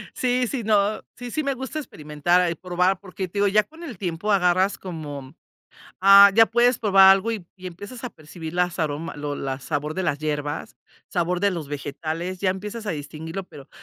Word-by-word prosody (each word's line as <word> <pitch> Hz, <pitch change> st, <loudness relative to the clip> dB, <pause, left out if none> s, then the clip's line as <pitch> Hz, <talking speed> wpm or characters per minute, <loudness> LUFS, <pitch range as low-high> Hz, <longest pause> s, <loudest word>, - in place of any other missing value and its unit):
Sí, 250 Hz, 0 st, +1 dB
sí, 245 Hz, -3 st, -3 dB
no 210 Hz, 0 st, +2 dB
sí, 245 Hz, 0 st, -7 dB
sí 310 Hz, -, -1 dB
me 280 Hz, -2 st, -1 dB
gusta 265 Hz, +4 st, -5 dB
experimentar, 155 Hz, -, 0 dB
ah, 180 Hz, -1 st, +1 dB
y -, -, -2 dB
probar, 180 Hz, +2 st, 0 dB
porque, 190 Hz, -1 st, -6 dB
te 200 Hz, -, -6 dB
digo, 205 Hz, -, +3 dB
ya 210 Hz, +2 st, +4 dB
con 320 Hz, +2 st, -16 dB
el 250 Hz, -, -8 dB
tiempo 180 Hz, +3 st, -2 dB
agarras 185 Hz, +1 st, +2 dB
como 145 Hz, -6 st, -7 dB, 0.7 s
ah, 200 Hz, +1 st, +9 dB
ya 225 Hz, +2 st, +7 dB
puedes 240 Hz, +2 st, +2 dB
probar 195 Hz, -3 st, +7 dB
algo, 195 Hz, +4 st, +2 dB
y 210 Hz, -6 st, -5 dB
y 185 Hz, -1 st, -8 dB
empiezas 205 Hz, +8 st, -10 dB
a 250 Hz, -, -3 dB
percibir 160 Hz, -1 st, -9 dB
las 180 Hz, -1 st, 0 dB
aroma 155 Hz, +1 st, -2 dB
lo 145 Hz, -1 st, -4 dB
la 135 Hz, -1 st, -4 dB
sabor 150 Hz, +2 st, -3 dB
de 190 Hz, -, -2 dB
las 145 Hz, -, 0 dB
hierbas, 150 Hz, 0 st, -3 dB, 0.3 s
sabor 175 Hz, 0 st, 0 dB
de 200 Hz, +1 st, +2 dB
los 165 Hz, -5 st, -5 dB
vegetales, 160 Hz, +5 st, -5 dB
ya 190 Hz, -, +1 dB
empiezas 210 Hz, +4 st, -5 dB
a 205 Hz, -, -1 dB
distinguirlo, 160 Hz, +4 st, -6 dB
pero, 140 Hz, -6 st, -14 dB
180 Hz, 205 wpm, -24 LUFS, 155-205 Hz, 0.7 s, ah